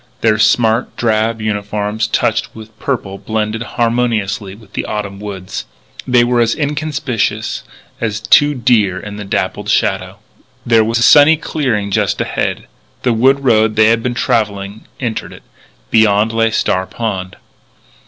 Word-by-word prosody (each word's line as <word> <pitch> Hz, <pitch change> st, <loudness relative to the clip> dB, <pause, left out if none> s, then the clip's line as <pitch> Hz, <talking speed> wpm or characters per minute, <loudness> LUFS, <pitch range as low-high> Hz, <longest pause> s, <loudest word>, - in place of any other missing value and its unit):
Their 110 Hz, -1 st, +2 dB
smart 115 Hz, +1 st, +2 dB
drab 110 Hz, 0 st, 0 dB
uniforms 105 Hz, +1 st, -2 dB
touched -, -, -1 dB
with 110 Hz, 0 st, -12 dB
purple 100 Hz, -8 st, -3 dB
blended 110 Hz, 0 st, -2 dB
harmoniously 115 Hz, -5 st, -1 dB
with 110 Hz, +1 st, -19 dB
the -, -, -3 dB
autumn 100 Hz, -2 st, -4 dB
woods. 100 Hz, -3 st, -6 dB, 0.4 s
They 125 Hz, -2 st, +4 dB
were 120 Hz, 0 st, +1 dB
as 115 Hz, 0 st, +2 dB
inconspicuous 145 Hz, -8 st, -2 dB, 0.4 s
as 110 Hz, -2 st, -2 dB
two 145 Hz, +7 st, +4 dB
deer 110 Hz, -7 st, +2 dB
in 105 Hz, +1 st, -8 dB
the 105 Hz, -, -6 dB
dappled 95 Hz, -, -2 dB
shadow. -, -, 0 dB, 0.5 s
There 115 Hz, -1 st, +4 dB
was 115 Hz, +2 st, 0 dB
a 120 Hz, -, +1 dB
sunny 150 Hz, +4 st, +7 dB
clearing 120 Hz, -11 st, -2 dB
just -, -, 0 dB
ahead. -, -, -2 dB, 0.4 s
The 125 Hz, -, +2 dB
wood 135 Hz, +4 st, +3 dB
road 110 Hz, -3 st, +3 dB
they 110 Hz, 0 st, +5 dB
had 115 Hz, 0 st, +2 dB
been 120 Hz, +1 st, -2 dB
travelling 105 Hz, -3 st, -1 dB
entered 115 Hz, -4 st, -4 dB
it. -, -, -14 dB, 0.5 s
Beyond 110 Hz, 0 st, +3 dB
lay 115 Hz, 0 st, +2 dB
Star 95 Hz, -4 st, 0 dB
Pond. 95 Hz, -5 st, -4 dB
110 Hz, 145 wpm, -16 LUFS, 105-120 Hz, 0.5 s, sunny